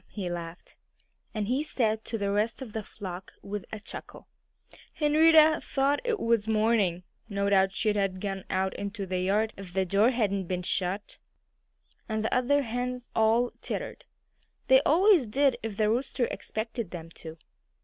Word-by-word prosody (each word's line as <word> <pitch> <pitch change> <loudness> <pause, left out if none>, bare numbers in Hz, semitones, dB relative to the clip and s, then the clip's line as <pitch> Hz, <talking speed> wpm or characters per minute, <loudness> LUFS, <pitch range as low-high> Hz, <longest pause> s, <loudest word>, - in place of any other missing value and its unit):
he 185 -4 -5
laughed. 170 0 -7 0.5
And 215 -2 -2
he 255 +5 +1
said 220 -7 0
to 225 - -3
the 200 -1 -1
rest 215 +6 0
of 225 -5 -10
the 220 - -2
flock, 185 -2 -8
with 205 -1 -5
a 220 - -5
chuckle, - - -10 0.7
"Henrietta 310 +1 +5
thought 275 +1 +1
it 470 -3 -1
was 230 - +1
morning! 215 -5 +2 0.3
No 200 0 0
doubt 195 -1 +4
she'd 210 +2 0
have 195 -2 0
gone 195 -1 -4
out 190 0 0
into 200 0 -4
the 185 -1 -2
yard 210 +4 +1
if 190 -2 -10
the 190 0 +1
door 200 +5 +4
hadn't 200 -7 0
been 180 0 -2
shut." 185 +3 -2 0.9
And 220 0 -1
the 220 - -1
other 280 +3 +2
hens 245 +1 -4
all 225 +2 +3
tittered. - - -4 0.6
They 265 0 +7
always 345 - +4
did, 265 +2 +2
if 220 -3 -5
the 215 -1 +2
rooster 250 +1 0
expected 225 -1 -4
them 165 -2 -8
to. 160 0 -8
215 Hz, 165 wpm, -28 LUFS, 195-245 Hz, 0.9 s, They